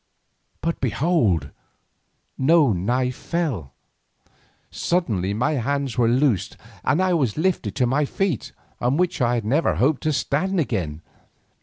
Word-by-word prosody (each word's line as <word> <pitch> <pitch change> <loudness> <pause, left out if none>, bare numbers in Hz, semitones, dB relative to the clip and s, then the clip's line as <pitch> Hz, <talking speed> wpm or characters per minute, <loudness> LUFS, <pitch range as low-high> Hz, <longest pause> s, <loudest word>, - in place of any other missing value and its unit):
But 165 0 -2
behold! 110 - +1 0.8
no 145 -3 +4
knife 125 +8 0
fell. 135 - -3 1.0
Suddenly 105 - -1
my 120 +7 +1
hands 140 0 -1
were 120 -3 +3
loosed 125 - +1 0.3
and 145 +5 +2
I 185 -1 +2
was 135 -9 0
lifted 185 +2 0
to 130 - +2
my 140 +5 +1
feet, 180 - -2 0.3
on 125 +4 +1
which 180 -4 0
I 120 0 +2
never 140 +10 +1
hoped 140 +2 +2
to 155 - 0
stand 165 +7 0
again. 85 - -2
130 Hz, 130 wpm, -23 LUFS, 115-160 Hz, 1.0 s, no